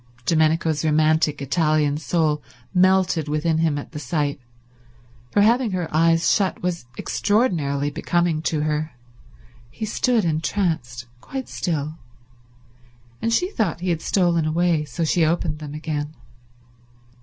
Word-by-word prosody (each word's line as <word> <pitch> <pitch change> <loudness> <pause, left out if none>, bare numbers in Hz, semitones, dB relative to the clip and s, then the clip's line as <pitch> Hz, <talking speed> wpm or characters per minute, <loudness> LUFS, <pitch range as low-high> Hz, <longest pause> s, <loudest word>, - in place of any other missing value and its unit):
Domenico's 160 0 +2
romantic 155 -1 +2
Italian 155 -1 +1
soul 155 -2 0 0.3
melted 185 -4 +3
within 155 +2 0
him 160 -3 +1
at 145 - -7
the 150 - -6
sight, 145 0 -2 0.9
for 205 - +3
having 230 -1 +3
her 180 -3 -1
eyes 165 +1 +3
shut 195 -4 +1
was 175 -7 -2
extraordinarily 155 - 0
becoming 170 +1 0
to 160 -2 -1
her. 155 0 -1 0.8
He 220 - -5
stood 225 0 +1
entranced, 160 -6 -1
quite 265 - -6
still, 155 -2 -3 1.2
and 230 - 0
she 360 - +1
thought 180 - -1
he 180 -1 0
had 165 -1 -1
stolen 175 -4 +2
away, 165 -1 +1
so 145 +4 -4
she 165 +1 +2
opened 160 -1 0
them 150 -1 -7
again. 150 -1 -4
160 Hz, 130 wpm, -22 LUFS, 150-180 Hz, 1.2 s, melted